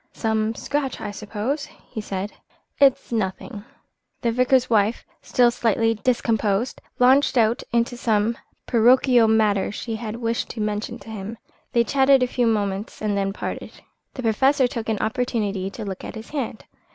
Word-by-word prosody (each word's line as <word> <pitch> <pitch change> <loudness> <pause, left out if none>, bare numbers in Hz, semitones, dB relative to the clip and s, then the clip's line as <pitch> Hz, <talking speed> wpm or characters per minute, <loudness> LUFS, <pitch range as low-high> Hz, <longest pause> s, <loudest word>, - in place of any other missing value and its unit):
"Some 220 0 0
scratch, 285 0 -2
I - - -4
suppose," 220 +8 -3 0.3
he 220 - -4
said. 200 0 -4 0.5
"It's 275 -3 +4
nothing." 205 0 -3 0.6
The 235 - +1
vicar's 250 +1 +3
wife, 220 -1 +1 0.2
still 245 -1 +3
slightly 225 -1 +1
discomposed, 225 -1 0 0.2
launched 260 +2 +4
out 230 +2 +3
into 235 +1 +1
some 225 -1 +1 0.3
parochial 245 0 +5
matter 215 -3 +2
she 225 +2 -4
had 220 -1 -5
wished 230 -1 -2
to 230 - -7
mention 210 0 -2
to 220 - -11
him. 215 +2 -6 0.4
They 235 - +4
chatted 270 +1 +4
a - - +2
few 245 -1 0
moments 205 -1 -1
and 210 -1 -1
then 195 0 0
parted. 195 - -6 0.4
The 255 - -5
Professor 265 +5 +3
took 230 -2 -5
an 220 - +1
opportunity 215 -4 -1
to 215 +2 -7
look 190 -2 -6
at - - -7
his 220 0 -9
hand. 270 -7 -4
225 Hz, 160 wpm, -23 LUFS, 210-245 Hz, 0.6 s, parochial